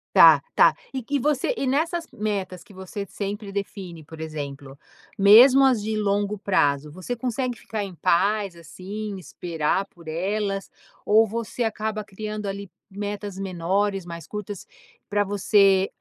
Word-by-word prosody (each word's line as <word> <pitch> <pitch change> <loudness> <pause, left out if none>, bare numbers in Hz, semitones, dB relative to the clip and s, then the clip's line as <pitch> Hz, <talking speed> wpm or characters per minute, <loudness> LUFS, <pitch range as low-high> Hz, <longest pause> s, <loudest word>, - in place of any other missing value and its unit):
Tá, - - +9
tá - - +6 0.2
e 260 -3 -4
que 285 +5 -3
e - - -2
você 295 - +1
e 275 - -2
nessas 330 +5 0
metas 205 -6 -3
que 215 -4 -17
você 190 +2 -6
sempre 205 +1 -5
define, 190 -5 -6
por 160 +1 -12
exemplo, 140 -3 -6 0.4
mesmo 240 +7 +8
as 255 -5 +4
de 215 +1 -2
longo 205 0 0
prazo, 150 -7 +1
você 185 +9 -5
consegue 250 +1 -2
ficar 215 -2 -4
em 195 -2 -7
paz, 195 +4 +1
assim, 195 +5 -7
esperar 170 +1 -2
por 170 -4 -18
elas 195 +4 -2 0.4
ou 220 +2 +5
você 230 +2 -3
acaba 215 -1 -2
criando 210 +1 -6
ali 200 -1 -5 0.2
metas 205 0 -5
menores, 195 +1 -1
mais 170 -1 -8
curtas 210 -2 -7 0.4
para 205 0 +1
você 195 -1 +3
200 Hz, 150 wpm, -24 LUFS, 185-215 Hz, 0.4 s, Tá